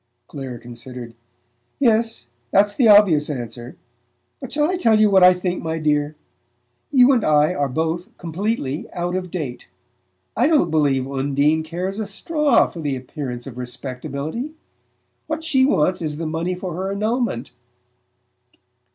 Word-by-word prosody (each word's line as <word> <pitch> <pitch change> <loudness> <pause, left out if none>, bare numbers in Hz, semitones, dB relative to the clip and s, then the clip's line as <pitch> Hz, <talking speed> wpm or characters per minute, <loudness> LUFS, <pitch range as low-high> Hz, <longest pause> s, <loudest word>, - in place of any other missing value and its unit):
Clare 130 -3 -7
considered. 120 0 -9 0.6
"Yes; 225 - +1 0.2
that's 205 +5 +3
the 240 +1 +3
obvious 195 -9 +6
answer. 120 -2 -6 0.6
But 265 -3 -8
shall 295 0 +2
I 365 - 0
tell 225 -12 +3
you 215 -1 +5
what 190 -2 +6
I 180 - +9
think, 180 0 -2
my 160 0 -3
dear? 150 -1 0 0.7
You 260 -1 +6
and 245 -5 +2
I 150 +2 +3
are 145 -4 -1
both 165 - -3
completely 170 - -3
out 175 0 -2
of 185 -1 -3
date. 145 - -5 0.7
I 245 +5 +3
don't 295 - +3
believe 140 -4 +2
Undine 140 +3 +1
cares 180 +5 -4
a 215 - -3
straw 295 +6 +2
for 170 - -9
'the 145 -3 -1
appearance 130 -2 -6
of 125 -2 -8
respectability.' 140 - -5 0.7
What 315 0 -3
she 270 -5 +3
wants 185 - +2
is 150 -2 -3
the 165 - -4
money 165 +3 -2
for 180 -1 -5
her 190 +3 -3
annulment." 215 - -1
165 Hz, 150 wpm, -21 LUFS, 140-215 Hz, 0.7 s, I